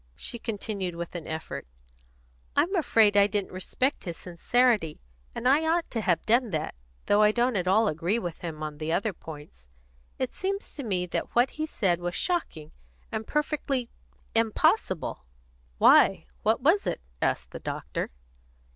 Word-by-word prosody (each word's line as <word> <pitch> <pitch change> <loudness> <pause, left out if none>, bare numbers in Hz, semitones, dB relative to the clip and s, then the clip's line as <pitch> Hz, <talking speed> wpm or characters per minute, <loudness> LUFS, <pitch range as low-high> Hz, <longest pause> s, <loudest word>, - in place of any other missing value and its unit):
She 235 - -6
continued 200 -5 -3
with 170 0 -6
an 170 -3 -6
effort: 160 - -5 0.9
"I'm 375 +5 +2
afraid 225 - +4
I 200 0 +6
didn't 205 -1 -2
respect 255 +9 -1
his 170 -2 -4
sincerity, 205 0 +1 0.4
and 250 - -1
I 285 +4 +5
ought 335 +1 +1
to 225 - -1
have 175 -5 +1
done 240 +1 +3
that, 155 -4 -2 0.3
though 205 +1 +4
I 210 0 +6
don't 240 +2 +1
at 180 -2 0
all 215 +4 +4
agree 170 +5 0
with 175 -8 -4
him 160 -3 -5
on 150 -1 -5
the 155 +1 -2
other 200 +4 0
points. 150 - -11 0.5
It 260 - -2
seems 395 +1 -3
to 290 - -7
me 185 -6 0
that 175 - -4
what 245 +2 +4
he 310 0 -3
said 185 - +1
was 175 0 -3
shocking, 240 - -2 0.4
and 220 0 -3
perfectly 290 -5 -1 0.4
impossible." 225 - +1 0.5
"Why, - - +6 0.2
what - - +2
was - - +3
it?" - - -1 0.2
asked 65 0 0
the - - -7
doctor. - - -4
205 Hz, 165 wpm, -27 LUFS, 170-245 Hz, 0.9 s, I